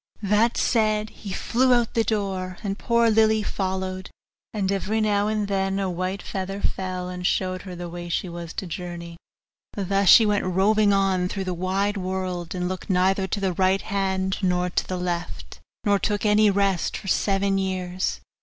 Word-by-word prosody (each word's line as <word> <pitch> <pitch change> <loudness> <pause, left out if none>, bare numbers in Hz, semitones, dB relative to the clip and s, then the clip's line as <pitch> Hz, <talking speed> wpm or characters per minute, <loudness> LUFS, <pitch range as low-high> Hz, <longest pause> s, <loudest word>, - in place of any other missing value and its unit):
This 210 +4 +3
said, 215 -2 +1
he 200 - -9
flew 250 +6 +2
out 240 -2 +2
at - - -25
the 230 - +2
door, 190 -4 -2
and 200 -1 -3
poor 235 -1 +3
Lily 220 0 +3
followed; 190 -1 -3 0.4
and 200 -3 -1
every 200 +3 -1
now 205 -1 +2
and 215 -1 -1
then 195 -1 0
a 195 -2 -1
white 185 +3 -3
feather 195 +1 -4
fell, 185 -2 -3
and 180 0 -6
showed 185 -1 -1
her 180 - -6
the 175 0 -6
way 175 0 -7
she 175 - -1
was 170 -1 -7
to - - -4
journey. 175 -1 -6 0.6
Thus 195 -1 +1
she 225 - +9
went 205 -1 +1
roving 205 +3 +3
on 190 -2 +2
through 195 0 -3
the 185 -1 -2
wide 195 +4 -1
world, 185 -2 -3
and 180 0 -1
looked 185 +2 -5
neither 190 +1 +2
to 205 - -2
the 190 -2 0
right 190 +2 +2
hand 190 -1 -1
nor 180 -1 +1
to - - -1
the 185 - -3
left, 175 -1 -4 0.2
nor 205 -2 +3
took 205 0 -1
any 210 0 +5
rest, 195 -3 +1
for 195 - -10
seven 195 +1 +1
years. 185 -1 -2
190 Hz, 185 wpm, -24 LUFS, 185-205 Hz, 0.6 s, she